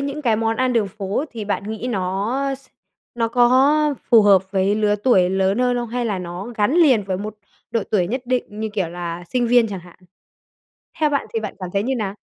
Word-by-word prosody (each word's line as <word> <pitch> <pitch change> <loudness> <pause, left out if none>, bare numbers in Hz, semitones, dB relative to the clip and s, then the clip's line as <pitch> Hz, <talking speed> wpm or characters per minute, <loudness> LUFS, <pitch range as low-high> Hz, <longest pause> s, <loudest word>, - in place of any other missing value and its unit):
những 280 +2 -4
cái 225 -4 +2
món 225 0 0
ăn 255 -1 +1
đường 220 -4 +1
phố 200 - -3
thì 225 -3 -6
bạn 200 -1 -2
nghĩ 220 +3 -5
nó 200 +6 -1
s 270 +1 -16 0.5
nó 230 -1 0
có 270 +5 +3 0.2
phù 225 -3 +7
hợp 195 -2 +5
với 195 +1 +1
lứa 210 -1 +2
tuổi 195 -5 +3
lớn 190 +3 +1
hơn 250 0 +2
không? 240 -1 -3
Hay 245 +1 -2
là 205 -5 -1
nó 175 +2 -6
gắn 210 +8 +1
liền 275 -11 +5
với 190 -1 -2
một 210 +2 -6 0.4
độ 230 -3 0
tuổi 185 -5 +2
nhất 255 +5 -3
định 255 0 0 0.2
như, 220 - -2
kiểu, 195 -5 -1
là 175 0 -6
sinh 245 -2 +1
viên 240 -1 +4
chẳng 195 -3 -5
hạn? 175 0 -17 1.0
Theo 305 -1 +3
bạn 280 -1 -1
thì 225 - 0
bạn 210 -2 -5
cảm 185 -1 -5
thấy 200 +1 +1
như 265 +2 -1
nào? 205 -4 -3
220 Hz, 230 wpm, -21 LUFS, 195-250 Hz, 1.0 s, phù